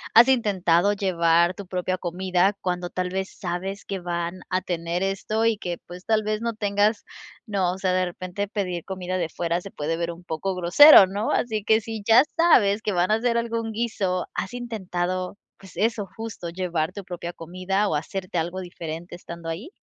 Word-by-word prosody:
¿has 235 +2 +9
intentado 200 -6 +3
llevar 170 -3 +2
tu 195 +1 -9
propia 185 0 -2
comida?, 185 +2 +1
cuando 180 -1 -2
tal 180 0 -2
vez, 190 +1 -3
sabes 190 +2 -4
que 195 - -4
van 175 0 -3
a 185 0 +1
tener 170 0 -2
esto, 205 +3 -1
y 230 -1 +2
que, 175 -4 -4
pues, 180 +2 -11
tal 220 -1 +2
vez 215 +1 -1
no 235 0 -1
tengas, 205 0 +1 0.4
¿no?, 195 -5 0
o - - -7
sea, 185 -1 0
de 185 0 +2
repente 185 +3 -4
pedir 180 -4 -3
comida 185 -1 -3
de 165 -2 -1
fuera, 170 +1 -1
se 195 - -9
puede 160 +3 -2
ver 170 0 -2
un 170 +1 -12
poco 175 +3 -3
grosero, 190 - +9
¿no?, 200 +4 -2
así 220 -3 0
que, 220 +1 +4
si 225 0 -6
ya 230 +4 +7
sabes 220 -12 +5
que 210 - -1
van 180 +1 +1
a - - +5
hacer 235 +1 +1
algún 230 -1 -2
guiso, 210 -5 -1
¿has 190 - -4
intentado?, 185 -5 -3 0.2
pues 190 -4 -14
eso, 215 -2 0
justo, 220 -6 -6
¿llevar 170 -3 -2
tu 200 - -8
propia 175 -1 -5
comida 185 +5 -2
o 160 - 0
hacerte 185 +4 -4
algo 175 +3 -3
diferente 175 -1 -7
estando 170 -1 -9
ahí? 165 - -5
185 Hz, 195 wpm, -24 LUFS, 175-210 Hz, 0.4 s, has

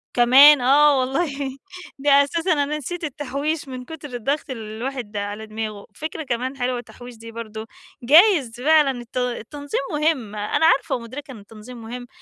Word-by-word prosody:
كمان 265 +4 +7
آه 280 +2 +5
والله، 275 0 -2 0.4
ده 280 0 +5
أساسًا 335 +4 0
أنا 290 +1 -1
نسيت 335 +4 -6
التحويش، 290 +1 -3
من 255 -1 -7
كتر 295 -3 -9
الضغط 275 +6 -2
اللي 220 -4 -7
الواحد 240 -4 -5
على 205 +2 -4
دماغه، 215 -1 -6
فكرة 310 +1 -5
كمان 255 +1 -3
حلوة 250 -1 -1
التحويش 245 +1 -12
دي 230 0 -11
برضه، 220 -1 -8 0.4
جايز 290 - +4
فعلًا 305 0 +4
الت 240 +1 -10
التنظيم 250 +4 -3
مهم، 295 -8 -1
أنا 210 +9 0
عارفة 275 - +3
ومدركة 255 +4 -8
إن 230 - -10
التنظيم 225 +4 -12
مهم 245 +2 -8
260 Hz, 155 wpm, -22 LUFS, 230-290 Hz, 0.4 s, كمان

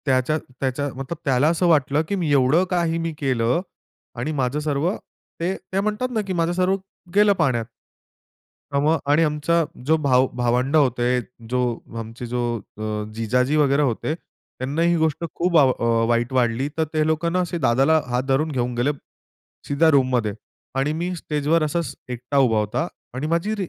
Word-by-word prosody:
त्याच्या 130 +2 +2 0.2
त्याच्या 135 +2 -1
मतलब 135 +5 -5
त्याला 135 +1 +3
असं 170 +2 +1
वाटलं, 150 -2 +3
की 200 - -1
मी 170 -6 -1
एवढं 140 +5 +4
काही 170 -2 +1
मी 165 -1 -2
केलं 125 +1 +1 0.6
आणि 145 +6 -2
माझं 130 +4 0
सर्व 150 +2 0 0.5
ते 180 +3 -1
ते 190 - -4
म्हणतात 215 +5 -1
ना, 225 -3 0
की 190 - -1
माझं 170 -1 +1
सर्व 185 +1 +2 0.4
गेलं 205 0 +6
पाण्यात. 120 - +1 1.1
मग 155 +3 +3
आणि 155 +3 +4
आमचा 155 +2 +1 0.2
जो 160 +3 +4
भाव 130 -1 +4
भावंड 125 +4 +1
होते, 125 -3 +3 0.3
जो 125 +1 0 0.4
आमचे 115 +2 -7
जो 125 +1 -3 0.4
अ, 110 0 -3
जिजाजी 125 +5 +1
वगैरे 145 -1 +3
होते, 135 +3 -1
त्यांना 140 -2 -6
ही 170 +1 +3
गोष्ट 160 0 0
खूप 175 -1 +2
आव 135 -4 +6 0.4
वाईट 120 +1 +1
वाटली. 125 +1 +1
तर 160 - +2
ते 155 -1 +2
लोकांना 170 +3 0
असे 175 -1 -1
दादाला 135 +3 +3
हात 125 +1 0
धरून 145 +4 +1
घेऊन 125 -2 -1
गेले 120 +5 +1 0.8
सीधा 155 +3 +3
रूममध्ये. 130 -6 +2 0.4
आणि 135 +3 +1
मी 175 +3 -2
स्टेजवर 155 0 0
असाच 150 -3 -2
एकटा 125 +3 -3
उभा 125 -5 +4
होता 105 +11 -1 0.3
आणि 130 +4 -3
माझी 170 +6 0
145 Hz, 165 wpm, -22 LUFS, 125-165 Hz, 1.1 s, गेलं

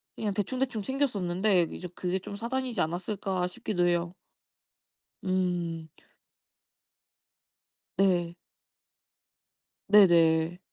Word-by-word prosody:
그냥 210 -2 -2
대충대충 235 +3 -2
챙겼었는데 200 -7 +1
이제 180 - -7
그게 180 +1 -2
좀 200 - -8
사단이지 240 -1 -2
않았을까 180 +2 -2
싶기도 180 -3 -1
해요. 175 0 0 1.1
음. 175 -3 -1 2.1
네. 175 -3 +2 1.5
네네. 170 -4 +5
185 Hz, 185 characters per minute, -28 LUFS, 175-210 Hz, 2.1 s, 네네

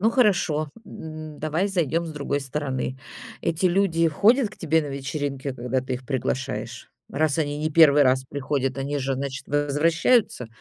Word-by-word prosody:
Ну 220 +3 +3
хорошо, 175 - +2
м, 155 -5 -9
давай 155 +6 0
зайдем 170 -3 0
с 160 - -6
другой 145 -1 -2
стороны. 135 -1 -3 0.4
Эти 165 +3 0
люди 175 -3 +2
ходят 225 - +3
к - - -14
тебе 160 -1 +1
на - - -5
вечеринки, 140 0 -4
когда 125 +1 -1
ты 130 0 -4
их 125 +1 -7
приглашаешь? 135 0 -3 0.2
Раз 155 +2 0
они 145 -2 -1
не 155 +1 -1
1 150 -2 +6
раз 130 -1 +3
приходят, 135 -1 -2
они 140 +2 -2
же, 135 0 -1
значит, 135 0 -5
возвращаются? 150 - +2
145 Hz, 165 wpm, -24 LUFS, 135-165 Hz, 0.4 s, 1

